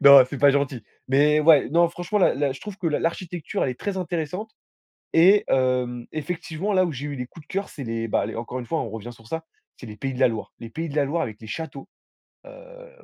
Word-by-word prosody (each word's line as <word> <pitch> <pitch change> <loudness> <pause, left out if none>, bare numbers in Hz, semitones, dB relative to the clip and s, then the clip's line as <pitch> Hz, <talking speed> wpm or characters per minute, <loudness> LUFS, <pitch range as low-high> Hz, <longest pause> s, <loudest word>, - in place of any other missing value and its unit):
Non, 140 -2 +10
c'est 140 - -5
pas 145 0 +6
gentil. 135 -4 0 0.3
Mais 150 +3 +4
ouais, 150 -3 +6
non, 170 +1 +4
franchement, 175 +4 -2
la 190 - +4
la 140 0 0
je 135 - -11
trouve 210 -2 -7
que 175 - -2
l'a 150 - 0
l'architecture, 170 0 -2
elle 130 - 0
est 125 - -7
très 200 -2 -2
intéressante 180 +3 -3 0.6
et 195 +5 +6
hem, 125 -2 +1
effectivement, 170 +5 -3
là 185 -1 +4
où 170 - -2
j'ai 140 +2 -5
eu 145 -2 -5
des 125 - -3
coups 160 +1 -14
de - - -12
cœur, 195 +1 -2
c'est 140 - -8
les 115 0 -2
bah, - - +1
les 110 - -6
encore 120 +2 -4
une 120 - -6
fois, 160 +7 -1
on 115 - -4
revient 115 +2 -7
sur 115 -1 -18
ça, 160 +3 -4 0.3
c'est 125 - -10
les 105 - -8
Pays 135 +4 -3
de 125 - -7
la - - +7
Loire. 110 -2 -6
Les 115 - -8
Pays 165 +7 -4
de 145 - -7
la 145 - +3
Loire 160 +5 -1
avec 110 -3 -6
les 110 - -10
châteaux. 140 +2 -6 0.6
Heu, - - -13
145 Hz, 260 wpm, -24 LUFS, 125-175 Hz, 0.6 s, Non